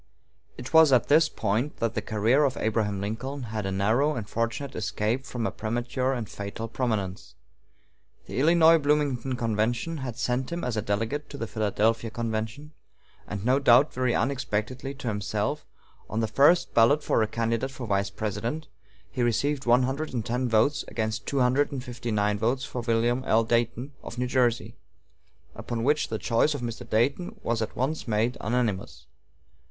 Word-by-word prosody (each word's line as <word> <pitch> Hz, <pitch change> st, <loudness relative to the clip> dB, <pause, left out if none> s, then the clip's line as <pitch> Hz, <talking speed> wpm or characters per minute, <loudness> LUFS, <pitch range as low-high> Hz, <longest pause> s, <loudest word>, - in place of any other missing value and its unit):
It 125 Hz, -, -8 dB
was 160 Hz, -3 st, +7 dB
at 125 Hz, -3 st, +3 dB
this 155 Hz, +2 st, +5 dB
point 115 Hz, +7 st, -1 dB
that 115 Hz, -1 st, -1 dB
the -, -, -2 dB
career 110 Hz, +7 st, +2 dB
of 135 Hz, -3 st, 0 dB
Abraham 105 Hz, -2 st, 0 dB
Lincoln 130 Hz, +7 st, -4 dB
had 110 Hz, -3 st, -4 dB
a -, -, -2 dB
narrow 110 Hz, +10 st, +2 dB
and 110 Hz, -5 st, -4 dB
fortunate 115 Hz, +6 st, -3 dB
escape 110 Hz, +6 st, -1 dB
from 120 Hz, -4 st, -3 dB
a -, -, -1 dB
premature 120 Hz, +4 st, -2 dB
and 120 Hz, -4 st, -3 dB
fatal 100 Hz, +3 st, -6 dB
prominence. 110 Hz, -6 st, -3 dB, 0.9 s
The -, -, -4 dB
Illinois 165 Hz, +2 st, +6 dB
Bloomington 145 Hz, -3 st, 0 dB
convention 120 Hz, +7 st, -1 dB
had 125 Hz, -4 st, -5 dB
sent 125 Hz, +2 st, -1 dB
him 170 Hz, 0 st, -3 dB
as 125 Hz, -2 st, -1 dB
a 110 Hz, -, 0 dB
delegate 115 Hz, +8 st, -2 dB
to 140 Hz, -, -8 dB
the 115 Hz, -, -3 dB
Philadelphia 110 Hz, +1 st, 0 dB
convention; 115 Hz, +5 st, -4 dB, 0.6 s
and, 100 Hz, 0 st, -5 dB
no 130 Hz, +3 st, +3 dB
doubt 135 Hz, +2 st, +5 dB
very 130 Hz, -1 st, 0 dB
unexpectedly 130 Hz, 0 st, -2 dB
to 135 Hz, -2 st, -7 dB
himself, 105 Hz, +7 st, -2 dB, 0.4 s
on 110 Hz, -, -2 dB
the 115 Hz, -, +1 dB
first 160 Hz, +9 st, +4 dB
ballot 130 Hz, +6 st, +4 dB
for -, -, +2 dB
a 110 Hz, -, +2 dB
candidate 115 Hz, +3 st, -1 dB
for 135 Hz, -2 st, -7 dB
Vice 100 Hz, -2 st, 0 dB
President 110 Hz, +9 st, -4 dB, 0.4 s
he 130 Hz, -, -3 dB
received 135 Hz, +3 st, 0 dB
one 120 Hz, +2 st, +5 dB
hundred 135 Hz, +2 st, -2 dB
and 115 Hz, -3 st, -2 dB
ten 125 Hz, +1 st, -1 dB
votes 115 Hz, +6 st, +2 dB
against 110 Hz, -1 st, -3 dB
two 140 Hz, -2 st, +1 dB
hundred 130 Hz, +4 st, +2 dB
and 135 Hz, -3 st, -4 dB
fifty 120 Hz, -2 st, -6 dB
nine 105 Hz, -1 st, +1 dB
votes 120 Hz, +4 st, 0 dB
for 125 Hz, -, -5 dB
William 120 Hz, +2 st, +1 dB
L. 115 Hz, +1 st, +4 dB
Dayton 120 Hz, +3 st, 0 dB
of 120 Hz, -, -9 dB
New 125 Hz, -, 0 dB
Jersey, 125 Hz, -2 st, 0 dB, 0.8 s
upon 115 Hz, -1 st, -4 dB
which 150 Hz, +4 st, +2 dB
the 110 Hz, -, -3 dB
choice 120 Hz, +7 st, +1 dB
of 140 Hz, -, -5 dB
Mr. 115 Hz, -1 st, -6 dB
Dayton 140 Hz, +11 st, 0 dB
was 115 Hz, -1 st, 0 dB
at 110 Hz, -, -3 dB
once 135 Hz, +4 st, -2 dB
made 115 Hz, +3 st, +1 dB
unanimous. 100 Hz, -, -2 dB
120 Hz, 175 wpm, -27 LUFS, 110-135 Hz, 0.9 s, was